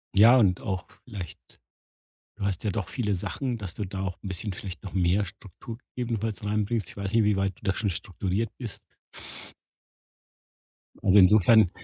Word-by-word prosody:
Ja 115 Hz, +6 st, +8 dB
und 95 Hz, -7 st, +3 dB
auch 95 Hz, -4 st, -3 dB, 0.2 s
vielleicht 100 Hz, -, -9 dB, 0.8 s
du 100 Hz, -, -2 dB
hast 100 Hz, -2 st, -1 dB
ja 105 Hz, -, +1 dB
doch 100 Hz, 0 st, -2 dB
viele 105 Hz, -6 st, 0 dB
Sachen, 125 Hz, +7 st, -3 dB
dass 100 Hz, -6 st, -5 dB
du 105 Hz, -, -4 dB
da 95 Hz, 0 st, -5 dB
auch 95 Hz, -1 st, -3 dB
'n -, -, -5 dB
bisschen 95 Hz, +2 st, -3 dB
vielleicht 95 Hz, +1 st, -7 dB
noch 95 Hz, -, -7 dB
mehr 95 Hz, +2 st, +2 dB
Struktur 100 Hz, +4 st, -10 dB, 0.2 s
ebenfalls 115 Hz, -3 st, -2 dB
reinbringst. 105 Hz, 0 st, 0 dB
Ich -, -, -11 dB
weiß 100 Hz, 0 st, -3 dB
nicht, 115 Hz, -1 st, +5 dB
wie 105 Hz, 0 st, +3 dB
weit 95 Hz, -1 st, -1 dB
du -, -, -25 dB
da 95 Hz, -2 st, +1 dB
schon 105 Hz, +1 st, -1 dB
strukturiert 95 Hz, +4 st, -2 dB
bist. 115 Hz, -6 st, -5 dB, 2.2 s
Also, 100 Hz, +2 st, +6 dB
insofern 105 Hz, +1 st, +7 dB
100 Hz, 170 wpm, -27 LUFS, 95-110 Hz, 2.2 s, Ja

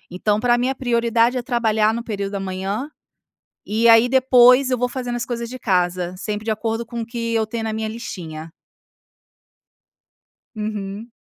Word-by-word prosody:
Então 210 Hz, +3 st, +1 dB
para 240 Hz, 0 st, +3 dB
mim 250 Hz, -, +1 dB
a 265 Hz, -, -2 dB
prioridade 235 Hz, -1 st, +1 dB
é 250 Hz, -, -1 dB
trabalhar 220 Hz, -3 st, +1 dB
no 235 Hz, +1 st, -4 dB
período 200 Hz, -3 st, -4 dB
da 200 Hz, -, -2 dB
manhã. 195 Hz, +8 st, -4 dB, 0.8 s
E 220 Hz, +3 st, +1 dB
aí 230 Hz, +1 st, +7 dB
depois, 255 Hz, 0 st, +5 dB
eu 250 Hz, -, +1 dB
vou 250 Hz, 0 st, 0 dB
fazendo 245 Hz, -1 st, -4 dB
as 240 Hz, -, -3 dB
coisas 235 Hz, -1 st, -4 dB
de 255 Hz, +2 st, -8 dB
casa, 180 Hz, -4 st, 0 dB
sempre 210 Hz, +2 st, -4 dB
de 225 Hz, -, -2 dB
acordo 225 Hz, +1 st, -2 dB
com 235 Hz, 0 st, -6 dB
o -, -, -6 dB
que 230 Hz, -1 st, -3 dB
eu 225 Hz, -, +2 dB
tenho 225 Hz, 0 st, -4 dB
na 220 Hz, -, -2 dB
minha 220 Hz, 0 st, -3 dB
listinha. 165 Hz, -8 st, -7 dB, 2.1 s
Uhum. 210 Hz, +1 st, -5 dB
225 Hz, 175 wpm, -21 LUFS, 210-240 Hz, 2.1 s, aí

